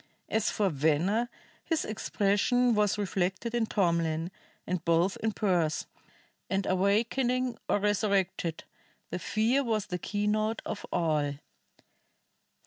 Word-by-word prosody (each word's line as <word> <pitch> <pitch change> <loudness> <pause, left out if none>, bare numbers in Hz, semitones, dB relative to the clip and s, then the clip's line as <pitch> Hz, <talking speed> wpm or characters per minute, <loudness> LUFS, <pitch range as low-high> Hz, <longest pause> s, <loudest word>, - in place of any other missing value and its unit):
As 220 -1 +1
for 205 -2 +1
Venner, 160 - +1 0.3
his 325 -2 0
expression 215 +4 +1
was 210 -1 +2
reflected 195 +2 -1
in 235 -2 +1
Tomlin, 170 -4 0 0.3
and 180 -1 -2
both 170 +3 +2
in 220 - -1
Pearse; 175 -7 0 0.6
and 195 0 0
awakening 235 +6 +1
or - - +4
resurrected, 200 -5 0 0.5
fear 220 +9 +1
was 220 -4 0
the 180 - -4
keynote 215 +3 -1
of 205 - -5
all. 155 -4 +1
200 Hz, 110 wpm, -29 LUFS, 175-220 Hz, 0.6 s, or